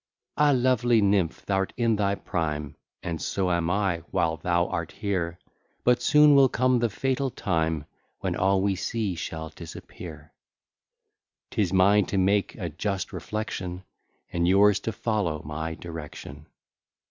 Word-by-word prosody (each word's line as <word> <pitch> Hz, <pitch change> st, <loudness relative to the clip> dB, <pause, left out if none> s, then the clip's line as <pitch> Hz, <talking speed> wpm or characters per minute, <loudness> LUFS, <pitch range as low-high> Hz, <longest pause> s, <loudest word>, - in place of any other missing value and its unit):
Ah! 150 Hz, 0 st, +4 dB
lovely 125 Hz, -3 st, +3 dB
nymph, 100 Hz, -5 st, +1 dB
thou'rt 95 Hz, -1 st, 0 dB
in 115 Hz, -2 st, +2 dB
thy 100 Hz, -1 st, +1 dB
prime! 75 Hz, -7 st, -3 dB, 0.3 s
And 85 Hz, -2 st, -4 dB
so 95 Hz, -2 st, -1 dB
am 85 Hz, -1 st, +1 dB
I, 95 Hz, -2 st, +1 dB
while 80 Hz, 0 st, 0 dB
thou 85 Hz, +1 st, +1 dB
art 85 Hz, -3 st, -3 dB
here; 90 Hz, -5 st, -2 dB, 0.5 s
But 125 Hz, 0 st, +3 dB
soon 150 Hz, 0 st, +6 dB
will 135 Hz, -2 st, +6 dB
come 130 Hz, 0 st, +2 dB
the 120 Hz, 0 st, +1 dB
fatal 135 Hz, +5 st, -1 dB
time, 80 Hz, -, -1 dB, 0.3 s
When -, -, -2 dB
all 95 Hz, 0 st, +2 dB
we 100 Hz, -1 st, +2 dB
see 105 Hz, +1 st, -2 dB
shall 80 Hz, -2 st, -5 dB
disappear. 80 Hz, -1 st, -10 dB, 1.2 s
'Tis 100 Hz, -5 st, 0 dB
mine 100 Hz, +1 st, +4 dB
to 100 Hz, -, -2 dB
make 100 Hz, +2 st, +2 dB
a 90 Hz, -, -4 dB
just 95 Hz, +4 st, -3 dB
reflection, 95 Hz, -4 st, -4 dB, 0.5 s
And 85 Hz, 0 st, +1 dB
yours 100 Hz, +2 st, +5 dB
to 115 Hz, -, -3 dB
follow 100 Hz, -9 st, -1 dB
my 80 Hz, +2 st, -4 dB
direction. 80 Hz, -3 st, -9 dB
95 Hz, 145 wpm, -26 LUFS, 85-110 Hz, 1.2 s, soon